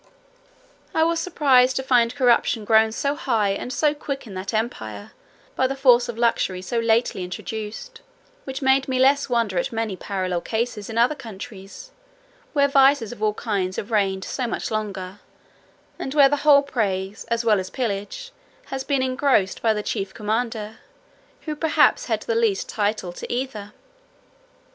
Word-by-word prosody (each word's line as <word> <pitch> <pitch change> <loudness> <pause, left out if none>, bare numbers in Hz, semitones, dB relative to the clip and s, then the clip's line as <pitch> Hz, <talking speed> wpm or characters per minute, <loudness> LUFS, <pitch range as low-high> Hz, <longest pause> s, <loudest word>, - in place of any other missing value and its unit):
I 320 - +4
was 335 0 +1
surprised 265 -7 +3
to 265 - -1
find 245 -2 +2
corruption 235 -3 +2
grown 220 +1 +4
so 280 +5 -1
high 225 -8 0
and 200 +5 -4
so 295 +3 +2
quick 280 -2 -5
in 210 - -10
that 190 +1 -5
empire, 110 - -4 0.4
by 260 - +2
the 270 - -3
force 250 -3 +4
of 235 - -5
luxury 195 -6 0
so 230 +5 -1
lately 230 -4 +1
introduced; 220 - -7 0.4
which 265 +1 -6
made 265 0 +3
me 260 -1 -1
less 275 +2 +3
wonder 230 -7 +1
at - - -2
many 225 -3 -2
parallel 185 -2 -3
cases 220 -1 -3
in 225 - -5
other 240 +5 +4
countries, 220 - -10 0.6
where 280 -2 +4
vices 275 -4 +4
of 240 - -10
all 210 -1 +1
kinds 195 -5 -2
have 215 - -5
reigned 195 -3 +1
so 255 -3 -3
much 230 - -4
longer, 200 -3 -4 0.8
and 270 - -5
where 280 -2 +7
the 290 - +1
whole 285 -1 +5
praise, 200 -7 -2
as 235 0 -1
well 215 -3 +4
as 185 0 -5
pillage, 245 - -4 0.3
has 265 0 -5
been 275 -2 0
engrossed 255 -7 +1
by 225 - +3
the 210 -1 -2
chief 195 -3 -3
commander, 220 0 -3 0.6
who 305 -2 -4
perhaps 320 +10 +3
had - - -1
the 470 - -1
least 455 -4 +1
title 205 -4 -2
to - - -7
either. 240 -5 -4
230 Hz, 165 wpm, -23 LUFS, 205-270 Hz, 0.8 s, where